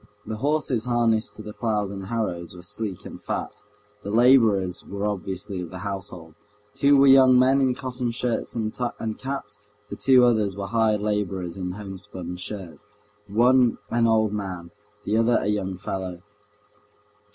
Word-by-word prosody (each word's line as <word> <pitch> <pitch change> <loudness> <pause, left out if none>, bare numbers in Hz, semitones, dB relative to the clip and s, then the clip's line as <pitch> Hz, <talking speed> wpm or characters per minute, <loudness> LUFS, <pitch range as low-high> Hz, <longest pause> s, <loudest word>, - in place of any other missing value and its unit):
The 110 - -4
horses 140 -3 0
harnessed 120 -2 +1
to 110 - -9
the 105 - -8
ploughs 105 -4 -1
and 95 -1 -7
harrows 90 -7 -3
were 90 - -11
sleek 105 0 -4
and - - -9
fat. - - -4 0.4
The 100 - -6
laborers 110 -6 +4
were 100 +1 -4
obviously 95 -1 -3
of 85 - -6
the 95 - -8
household: 90 -5 -6 0.4
two 140 0 +4
were 135 - +6
young 135 -2 +7
men 130 +2 +4
in 130 -2 +2
cotton 125 -2 -3
shirts 120 0 -2
and 110 -2 -2 0.5
caps, 130 -7 -5 0.3
the - - -3
two 130 -2 +5
others 105 -5 +1
were 100 - -3
hired 110 0 +1
laborers 95 -4 -2
in 90 -1 -4
homespun 95 -3 -7
shirts, 90 -4 -8 0.4
one 120 +3 +4
an 115 0 +3
old 110 -2 +2
man, 90 -5 -5 0.3
the 105 +2 0
other 115 +1 +3
a - - -2
young 100 -3 -1
fellow. 90 -1 -5
105 Hz, 160 wpm, -24 LUFS, 95-120 Hz, 0.5 s, young